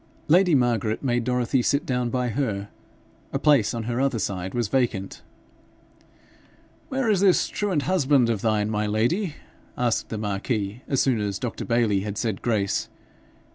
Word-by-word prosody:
Lady 175 Hz, 0 st, +5 dB
Margaret 120 Hz, -3 st, +1 dB
made 120 Hz, -3 st, +1 dB
Dorothy 125 Hz, +1 st, +1 dB
sit 140 Hz, +4 st, +1 dB
down 125 Hz, -2 st, -1 dB
by 125 Hz, 0 st, -1 dB
her. 105 Hz, -5 st, -2 dB, 0.6 s
A -, -, 0 dB
place 145 Hz, -8 st, +3 dB
on 115 Hz, -1 st, -4 dB
her 120 Hz, +3 st, -2 dB
other 135 Hz, -3 st, +1 dB
side 95 Hz, -2 st, -3 dB
was 120 Hz, -3 st, 0 dB
vacant. 115 Hz, -5 st, -1 dB, 1.7 s
'Where 265 Hz, -2 st, -1 dB
is 210 Hz, -4 st, +3 dB
this 195 Hz, -2 st, +4 dB
truant 190 Hz, -8 st, -1 dB
husband 145 Hz, -9 st, +3 dB
of 115 Hz, -4 st, -1 dB
thine, 110 Hz, -1 st, +1 dB
my 105 Hz, 0 st, 0 dB
lady?' 145 Hz, -, 0 dB, 0.4 s
asked 120 Hz, -2 st, 0 dB
the 110 Hz, -, -4 dB
marquis, 105 Hz, +1 st, -2 dB
as 135 Hz, -, +1 dB
soon 130 Hz, -5 st, +1 dB
as 100 Hz, -2 st, -2 dB
Dr. 120 Hz, +1 st, -4 dB
Bayly 115 Hz, -4 st, +2 dB
had 105 Hz, +1 st, -5 dB
said 110 Hz, -5 st, -2 dB
grace. 105 Hz, -5 st, 0 dB
120 Hz, 160 wpm, -24 LUFS, 105-135 Hz, 1.7 s, Lady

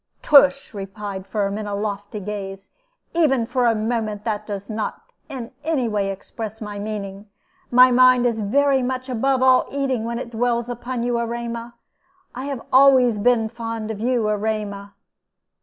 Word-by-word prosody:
"Tush!" 275 Hz, -2 st, +5 dB
replied 195 Hz, -1 st, -6 dB
Firm, 200 Hz, -1 st, -1 dB
with 210 Hz, 0 st, -4 dB
a 205 Hz, -, -3 dB
lofty 205 Hz, 0 st, -4 dB
gaze. 195 Hz, -1 st, -6 dB, 0.4 s
"Even 280 Hz, -8 st, +2 dB
for 245 Hz, +1 st, +1 dB
a 230 Hz, -, +3 dB
moment 215 Hz, -1 st, -2 dB
that 215 Hz, -2 st, -3 dB
does 200 Hz, -1 st, -5 dB
not 215 Hz, -1 st, -3 dB, 0.3 s
in 245 Hz, -4 st, -6 dB
any 290 Hz, -6 st, 0 dB
way 205 Hz, -3 st, -1 dB
express 215 Hz, +2 st, -7 dB
my 210 Hz, -2 st, -6 dB
meaning. 205 Hz, -1 st, -6 dB, 0.4 s
My 250 Hz, +1 st, +7 dB
mind 255 Hz, 0 st, +5 dB
is 230 Hz, -2 st, +1 dB
very 270 Hz, +6 st, +2 dB
much 255 Hz, +1 st, -3 dB
above 260 Hz, +2 st, +1 dB
all 260 Hz, -1 st, +5 dB
eating 270 Hz, -4 st, -1 dB
when 235 Hz, +1 st, -3 dB
it 235 Hz, -1 st, -6 dB
dwells 235 Hz, +1 st, 0 dB
upon 245 Hz, 0 st, -4 dB
you, 240 Hz, -1 st, 0 dB
Erema. 235 Hz, 0 st, -4 dB, 0.6 s
I 255 Hz, +2 st, -6 dB
have 275 Hz, -4 st, -4 dB
always 260 Hz, -4 st, +6 dB
been 230 Hz, 0 st, +3 dB
fond 225 Hz, -1 st, -5 dB
of 210 Hz, -, -6 dB
you, 235 Hz, -1 st, +1 dB
Erema." 210 Hz, -1 st, -3 dB
230 Hz, 160 wpm, -22 LUFS, 210-250 Hz, 0.6 s, My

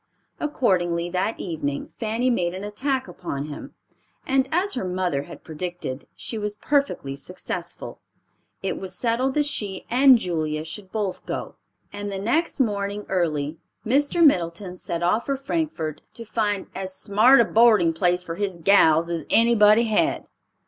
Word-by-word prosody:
Accordingly, 175 Hz, -, 0 dB
that 185 Hz, +5 st, -1 dB
evening 150 Hz, -5 st, -4 dB
Fanny 230 Hz, +3 st, 0 dB
made 175 Hz, -6 st, 0 dB
an 190 Hz, -, -6 dB
attack 260 Hz, +6 st, -2 dB
upon 140 Hz, +1 st, -5 dB
him, 145 Hz, -, -9 dB, 0.5 s
and 265 Hz, 0 st, +1 dB
as 370 Hz, +5 st, +1 dB
her 250 Hz, -, -2 dB
mother 180 Hz, -6 st, -1 dB
had -, -, -12 dB
predicted, 160 Hz, -5 st, -5 dB
she 225 Hz, -, -5 dB
was 210 Hz, 0 st, -3 dB
perfectly 275 Hz, -, 0 dB
successful. 175 Hz, +2 st, -6 dB, 0.6 s
It -, -, -2 dB
was 190 Hz, -1 st, -6 dB
settled 250 Hz, +3 st, 0 dB
that 295 Hz, -1 st, +2 dB
she 205 Hz, -9 st, -3 dB
and 260 Hz, +1 st, +7 dB
Julia 155 Hz, -6 st, -2 dB
should 185 Hz, +3 st, -7 dB
both 205 Hz, -4 st, -3 dB
go, -, -, -4 dB, 0.4 s
and 205 Hz, 0 st, -5 dB
the 195 Hz, -, -3 dB
next 265 Hz, -, 0 dB
morning 205 Hz, -3 st, -1 dB
early 155 Hz, -4 st, -1 dB, 0.3 s
Mr. 285 Hz, +7 st, +3 dB
Middleton 180 Hz, -, +1 dB
set 170 Hz, -1 st, -4 dB
off 210 Hz, +7 st, +1 dB
for 275 Hz, -, +1 dB
Frankfort 270 Hz, -, -3 dB
to 230 Hz, -, -7 dB
find 210 Hz, -3 st, -1 dB
"as 190 Hz, -1 st, -5 dB
smart 220 Hz, +9 st, +5 dB
a 235 Hz, -, +6 dB
boarding 215 Hz, -8 st, +5 dB
place 180 Hz, +2 st, +1 dB
for 165 Hz, -, -5 dB
his 190 Hz, 0 st, -2 dB
gals 165 Hz, -3 st, +5 dB
as 170 Hz, -3 st, -4 dB
anybody 225 Hz, -1 st, +5 dB
had." 220 Hz, -2 st, +1 dB
200 Hz, 155 wpm, -24 LUFS, 175-235 Hz, 0.6 s, and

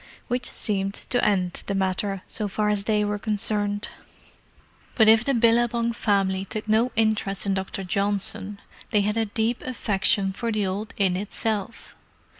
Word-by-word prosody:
Which 245 Hz, +1 st, -1 dB
seemed 195 Hz, -2 st, 0 dB, 0.2 s
to 245 Hz, -, +2 dB
end 185 Hz, -4 st, +1 dB
the 200 Hz, -, -1 dB
matter, 195 Hz, 0 st, -1 dB
so 210 Hz, -, -4 dB
far 210 Hz, +2 st, -1 dB
as 205 Hz, -1 st, -1 dB
they 210 Hz, -1 st, +1 dB
were 205 Hz, 0 st, -2 dB
concerned. 205 Hz, 0 st, 0 dB, 1.1 s
But 220 Hz, -3 st, +5 dB
if 220 Hz, +1 st, +6 dB
the 275 Hz, +1 st, +1 dB
Billabong 235 Hz, 0 st, +2 dB
family 195 Hz, -4 st, 0 dB
took 215 Hz, +3 st, -6 dB
no 225 Hz, +4 st, +2 dB
interest 215 Hz, -3 st, +1 dB
in 200 Hz, -, +1 dB
Dr. 190 Hz, 0 st, -3 dB
Johnson, 200 Hz, +1 st, 0 dB, 0.3 s
they 210 Hz, -, +3 dB
had 210 Hz, +1 st, 0 dB
a 225 Hz, 0 st, +1 dB
deep 225 Hz, +3 st, -1 dB
affection 200 Hz, -5 st, +1 dB
for 230 Hz, +3 st, -3 dB
the 210 Hz, -2 st, 0 dB
old 200 Hz, +3 st, -4 dB
inn 190 Hz, -3 st, +2 dB
itself. 210 Hz, +2 st, -3 dB
210 Hz, 160 wpm, -24 LUFS, 195-225 Hz, 1.1 s, if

